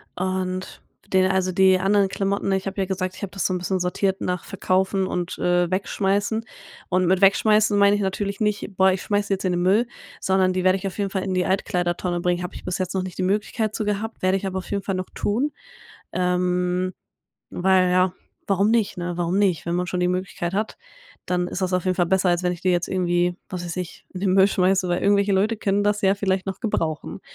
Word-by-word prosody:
Und, 185 Hz, 0 st, -3 dB, 0.3 s
den 185 Hz, 0 st, +3 dB
also, 185 Hz, -1 st, +1 dB
die 190 Hz, +1 st, +5 dB
anderen 195 Hz, +1 st, +3 dB
Klamotten 195 Hz, 0 st, -1 dB
ich 190 Hz, 0 st, -1 dB
habe 195 Hz, 0 st, -3 dB
ja -, -, +1 dB
gesagt, 185 Hz, -1 st, -3 dB
ich -, -, -12 dB
habe 195 Hz, -2 st, -4 dB
das 195 Hz, -, -3 dB
so 185 Hz, -, +1 dB
'n -, -, 0 dB
bisschen 185 Hz, +1 st, -1 dB
sortiert 190 Hz, +2 st, 0 dB
nach 180 Hz, -1 st, -2 dB
Verkaufen 190 Hz, 0 st, 0 dB
und, 180 Hz, -1 st, -3 dB
äh, 175 Hz, -1 st, +2 dB
Wegschmeißen 200 Hz, +3 st, 0 dB, 0.5 s
und 185 Hz, 0 st, +2 dB
mit 185 Hz, +2 st, +2 dB
wegschmeißen 210 Hz, +1 st, +4 dB
meine 200 Hz, 0 st, +5 dB
ich 205 Hz, -, -1 dB
natürlich 200 Hz, +1 st, -2 dB
nicht: 210 Hz, -2 st, -1 dB
„Boah, 190 Hz, 0 st, +5 dB
ich 185 Hz, -, -2 dB
schmeiße 205 Hz, -1 st, -1 dB
jetzt 195 Hz, -, -3 dB
in 185 Hz, -, +2 dB
den 175 Hz, 0 st, 0 dB
Müll“, 200 Hz, +6 st, +3 dB, 0.3 s
sondern 190 Hz, -1 st, +2 dB
die 185 Hz, 0 st, -1 dB
werde 185 Hz, +1 st, +4 dB
ich 195 Hz, +1 st, -4 dB
auf 190 Hz, -, -7 dB
jeden 200 Hz, -2 st, -1 dB
Fall 190 Hz, -2 st, -2 dB
in 190 Hz, -1 st, -2 dB
die 180 Hz, -1 st, +1 dB
Altkleider-Tonne 175 Hz, -1 st, -1 dB
bringen. 180 Hz, 0 st, 0 dB
Habe 180 Hz, -, -6 dB
ich -, -, -9 dB
bis 180 Hz, -, -2 dB
jetzt 185 Hz, 0 st, -2 dB
noch 190 Hz, -, 0 dB
nicht 185 Hz, -1 st, -7 dB
die -, -, +1 dB
Möglichkeit 210 Hz, +2 st, -1 dB
zu 215 Hz, -, -2 dB
gehabt, 210 Hz, +1 st, -3 dB
werde 185 Hz, +1 st, +3 dB
ich 195 Hz, -, -4 dB
aber 190 Hz, 0 st, -3 dB
auf 185 Hz, -, -10 dB
jeden 200 Hz, -1 st, -1 dB
Fall 195 Hz, -1 st, -2 dB
noch 185 Hz, 0 st, -4 dB
tun. 250 Hz, +9 st, 0 dB, 0.6 s
Ähm, 180 Hz, 0 st, 0 dB, 0.6 s
weil 185 Hz, 0 st, +3 dB
ja, 185 Hz, 0 st, +3 dB, 0.3 s
warum 200 Hz, +2 st, +2 dB
nicht, 225 Hz, -3 st, +1 dB
ne? 175 Hz, 0 st, -3 dB
Warum 175 Hz, +2 st, 0 dB
nicht? 190 Hz, -6 st, +1 dB
Wenn 170 Hz, -, -1 dB
man 180 Hz, 0 st, 0 dB
schon 180 Hz, 0 st, -2 dB
die 180 Hz, -, +2 dB
Möglichkeit 180 Hz, -1 st, -3 dB
hat, 215 Hz, +2 st, -2 dB, 0.5 s
dann 180 Hz, -1 st, 0 dB
ist 180 Hz, -, -5 dB
das 185 Hz, -, 0 dB
auf 180 Hz, -, 0 dB
jeden 185 Hz, -1 st, +1 dB
Fall 175 Hz, -2 st, +2 dB
besser, 190 Hz, 0 st, +2 dB
als 175 Hz, +1 st, +1 dB
wenn 180 Hz, -, +1 dB
ich 175 Hz, -, -8 dB
die 185 Hz, -, +2 dB
jetzt 175 Hz, -1 st, 0 dB
irgendwie, 175 Hz, -1 st, +1 dB
was 180 Hz, -2 st, -4 dB
weiß 170 Hz, 0 st, -5 dB
ich, 180 Hz, -2 st, -6 dB
in 180 Hz, -, -5 dB
den 190 Hz, -1 st, +1 dB
Müll 190 Hz, 0 st, +6 dB
schmeiße, 190 Hz, -1 st, +2 dB
weil 175 Hz, 0 st, 0 dB
irgendwelche 200 Hz, 0 st, +3 dB
Leute 205 Hz, +4 st, +2 dB
können 205 Hz, 0 st, +1 dB
das 205 Hz, 0 st, +1 dB
ja 195 Hz, 0 st, +4 dB
vielleicht 190 Hz, -1 st, -1 dB
noch 195 Hz, 0 st, -4 dB
gebrauchen. 165 Hz, -, -2 dB
185 Hz, 235 wpm, -23 LUFS, 180-200 Hz, 0.6 s, Müll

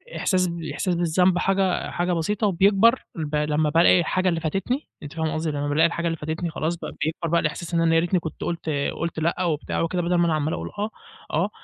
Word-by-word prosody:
إحساس 185 Hz, -2 st, +1 dB
ب 170 Hz, 0 st, -5 dB
إحساس 180 Hz, -2 st, -1 dB
بالذنب 175 Hz, +2 st, +2 dB
حاجة 190 Hz, -1 st, +1 dB
حاجة 175 Hz, +1 st, 0 dB
بسيطة 205 Hz, +6 st, 0 dB
وبيكبر، 200 Hz, +6 st, +4 dB
البا 150 Hz, -2 st, -1 dB
لمّا 150 Hz, 0 st, +1 dB
بالاقي 165 Hz, +3 st, +5 dB
الحاجة 185 Hz, +2 st, +1 dB
اللي 165 Hz, -1 st, 0 dB
فاتتني، 195 Hz, -, -2 dB, 0.2 s
أنتِ 145 Hz, -, -8 dB
فاهمة 160 Hz, -1 st, -2 dB
قصدي؟ 155 Hz, 0 st, -1 dB
لمّا 145 Hz, 0 st, -2 dB
بالاقي 155 Hz, +3 st, +4 dB
الحاجة 170 Hz, 0 st, -4 dB
اللي 165 Hz, 0 st, -1 dB
فاتتني، 160 Hz, +3 st, -3 dB
خلاص 160 Hz, +1 st, -2 dB
بقى، 170 Hz, -, -7 dB
بيكبر 165 Hz, +1 st, -2 dB
بقى 170 Hz, 0 st, +3 dB
الإحساس 160 Hz, +3 st, -3 dB
إن 165 Hz, -, +2 dB
أنا 165 Hz, 0 st, +3 dB
يا 165 Hz, -, +6 dB
ريتني 175 Hz, +2 st, +1 dB
كنت 160 Hz, -2 st, -7 dB
قُلت 165 Hz, -2 st, -3 dB, 0.3 s
قُلت 170 Hz, -1 st, -3 dB
لأ 170 Hz, +3 st, 0 dB
وبتاع 155 Hz, -4 st, -1 dB
وكده 175 Hz, +2 st, 0 dB
بدل 175 Hz, +1 st, 0 dB
ما 175 Hz, -, +3 dB
أنا 165 Hz, -, +1 dB
عمال 155 Hz, +1 st, -1 dB
اقول 85 Hz, +1 st, -4 dB
آه، 210 Hz, +1 st, -1 dB, 0.4 s
آه. 170 Hz, +7 st, +1 dB
170 Hz, 225 wpm, -24 LUFS, 160-180 Hz, 0.4 s, يا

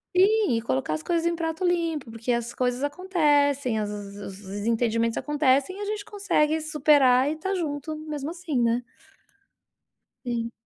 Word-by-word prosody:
Sim, 395 Hz, -, +4 dB
e -, -, -2 dB
colocar 145 Hz, -, -1 dB
as 155 Hz, -, -3 dB
coisas 335 Hz, -, 0 dB
em 340 Hz, 0 st, +1 dB
pratos 325 Hz, +2 st, -1 dB
limpos, 330 Hz, -8 st, -1 dB
porque 230 Hz, +2 st, -3 dB
as 235 Hz, 0 st, -1 dB
coisas 250 Hz, +1 st, -1 dB
acontecem, 290 Hz, -, +1 dB
as 210 Hz, -1 st, -2 dB
os 200 Hz, -1 st, -7 dB
desentendimentos 230 Hz, +3 st, 0 dB
acontecem 290 Hz, +3 st, +1 dB
e 410 Hz, -, -8 dB
a -, -, -3 dB
gente 420 Hz, 0 st, -4 dB
consegue 320 Hz, -7 st, +1 dB
superar 285 Hz, -4 st, +4 dB
e -, -, -1 dB
estar 385 Hz, +5 st, -3 dB
junto 310 Hz, -2 st, -3 dB
mesmo 305 Hz, -1 st, -5 dB
assim, 330 Hz, -7 st, -2 dB
né. 235 Hz, +1 st, +1 dB, 1.4 s
Sim. 235 Hz, -1 st, -2 dB
285 Hz, 160 wpm, -26 LUFS, 235-330 Hz, 1.4 s, Sim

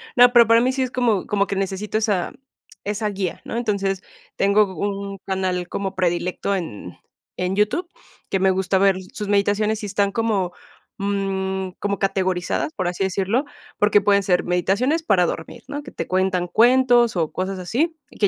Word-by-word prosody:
No, 245 Hz, 0 st, +7 dB
pero 235 Hz, -3 st, +7 dB
para 230 Hz, +1 st, +5 dB
mí 255 Hz, +2 st, +2 dB
sí 265 Hz, 0 st, -2 dB
es 255 Hz, -, -1 dB
como 235 Hz, -7 st, +1 dB
como 200 Hz, -1 st, +1 dB
que 200 Hz, -, -2 dB
necesito 195 Hz, +2 st, -2 dB
esa 205 Hz, -5 st, 0 dB, 0.5 s
esa 210 Hz, +1 st, -1 dB
guía, 190 Hz, -3 st, -3 dB
¿no?, -, -, -5 dB
entonces, 200 Hz, -4 st, -1 dB, 0.4 s
tengo 200 Hz, +2 st, +4 dB
un 200 Hz, 0 st, -3 dB
canal 185 Hz, -2 st, -1 dB
como 195 Hz, +1 st, -4 dB
predilecto 180 Hz, +2 st, 0 dB
en 105 Hz, -, -6 dB, 0.4 s
en 180 Hz, +1 st, -1 dB
YouTube, 215 Hz, -, +1 dB, 0.4 s
que 195 Hz, -, 0 dB
me 190 Hz, 0 st, +4 dB
gusta 190 Hz, +1 st, +1 dB
ver 195 Hz, -1 st, +4 dB, 0.2 s
sus 210 Hz, -, -4 dB
meditaciones 205 Hz, +2 st, +1 dB
y -, -, -2 dB
están 200 Hz, 0 st, 0 dB
como 205 Hz, -5 st, 0 dB, 0.5 s
mm, 190 Hz, -1 st, -2 dB
como 200 Hz, -1 st, -1 dB
categorizadas, 190 Hz, -, -1 dB
por 185 Hz, -3 st, -2 dB
así 180 Hz, +2 st, -2 dB
decirlo, 195 Hz, +8 st, 0 dB, 0.3 s
porque 205 Hz, 0 st, +4 dB
pueden 200 Hz, 0 st, +3 dB
ser 180 Hz, -2 st, +2 dB
meditaciones 200 Hz, -, +1 dB
para 190 Hz, -, +3 dB
dormir, 160 Hz, -1 st, -5 dB
¿no?, 290 Hz, +1 st, -5 dB
que 275 Hz, -, -10 dB
te -, -, -5 dB
cuentan 185 Hz, -1 st, 0 dB
cuentos 240 Hz, +1 st, +4 dB
o 160 Hz, -3 st, 0 dB
cosas 190 Hz, 0 st, -3 dB
así, 290 Hz, -, -1 dB, 0.2 s
que 205 Hz, -, +4 dB
200 Hz, 175 wpm, -22 LUFS, 190-220 Hz, 0.5 s, No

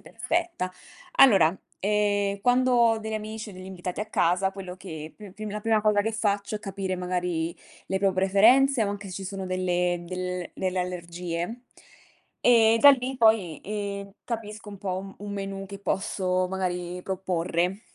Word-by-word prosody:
perfetta. 250 Hz, -, -2 dB, 0.4 s
Allora, 190 Hz, -10 st, +7 dB, 0.2 s
ehm, 205 Hz, -1 st, +1 dB
quando 250 Hz, +3 st, +3 dB
ho 230 Hz, -2 st, +4 dB
degli 220 Hz, 0 st, -5 dB
amici 215 Hz, 0 st, -5 dB
o -, -, -12 dB
degli 185 Hz, 0 st, -10 dB
invitati 180 Hz, 0 st, -5 dB
a 210 Hz, -, -2 dB
casa, 190 Hz, -1 st, +2 dB
quello 190 Hz, -2 st, -8 dB
che 160 Hz, -4 st, -8 dB
più 205 Hz, -3 st, -12 dB
pri 215 Hz, 0 st, -6 dB
la 210 Hz, -, -4 dB
prima 220 Hz, 0 st, +2 dB
cosa 210 Hz, -1 st, +4 dB
che 225 Hz, +2 st, -1 dB
faccio 205 Hz, -1 st, -1 dB
è 210 Hz, -, -1 dB
capire 195 Hz, -2 st, -4 dB
magari 180 Hz, -2 st, -2 dB, 0.3 s
le 190 Hz, -, -1 dB
pro 195 Hz, 0 st, +2 dB
preferenze 225 Hz, +8 st, +5 dB
o 205 Hz, -, 0 dB
anche 200 Hz, -1 st, -5 dB
se -, -, -7 dB
ci 190 Hz, 0 st, -5 dB
sono 195 Hz, 0 st, -5 dB
delle 180 Hz, -1 st, 0 dB
del 180 Hz, -1 st, -4 dB
delle 185 Hz, -1 st, -2 dB
allergie. 180 Hz, +4 st, -4 dB, 0.8 s
E 230 Hz, -2 st, +6 dB
da 285 Hz, -, +10 dB
lì 260 Hz, 0 st, 0 dB
poi, 220 Hz, -, +3 dB
ehm, 200 Hz, -1 st, -4 dB
capisco 215 Hz, -3 st, -5 dB
un 200 Hz, -, -9 dB
po' 185 Hz, -1 st, -2 dB
un 195 Hz, 0 st, -8 dB
un 205 Hz, 0 st, -6 dB
menù 195 Hz, -1 st, -5 dB
che 200 Hz, +1 st, -8 dB
posso 185 Hz, -2 st, 0 dB
magari 180 Hz, -1 st, -3 dB
proporre. 180 Hz, 0 st, -1 dB
195 Hz, 170 wpm, -26 LUFS, 180-215 Hz, 0.8 s, da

